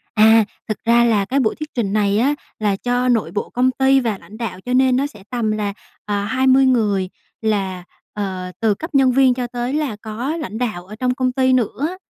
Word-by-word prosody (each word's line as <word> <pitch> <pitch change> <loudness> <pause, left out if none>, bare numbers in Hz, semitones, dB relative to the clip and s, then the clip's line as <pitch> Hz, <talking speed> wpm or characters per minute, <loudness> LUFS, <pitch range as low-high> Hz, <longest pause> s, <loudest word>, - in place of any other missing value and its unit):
À, 220 0 +6 0.2
thực 215 - -4
ra 235 +1 +4
là 210 -4 +2
cái 270 +6 0
buổi 220 - +1
thuyết 305 -1 -8
trình 210 -5 -1
này 205 -1 +2
á 280 +5 +2 0.2
là 205 -2 0
cho 245 +3 0
nội 230 -3 +1
bộ 205 - -4
công 255 +1 +2
ty 265 +1 +3
và 220 -5 -2
lãnh 215 - -14
đạo, 200 -6 -5
cho 250 +5 -5
nên 260 -1 +4
nó 275 +2 +1
sẽ 210 -9 -13
tầm 235 -3 -1
là, 210 -1 -2 0.3
ờ, 205 -1 -1
20 260 +3 +3
người 205 -7 +2 0.3
là, 190 -4 -1 0.3
ờ, 185 -3 -4
từ 220 -3 +2
cấp 320 - -8
nhân 265 -2 +4
viên 260 -1 +4
cho 250 -1 -3
tới 245 +2 -4
là 295 -9 -1
có 240 +9 -3
lãnh 220 - -5
đạo 210 -8 -3
ở 215 +2 -10
trong 250 +1 0
công 255 -1 0
ty 260 0 +2
nữa. 275 - 0
235 Hz, 225 wpm, -20 LUFS, 210-260 Hz, 0.3 s, À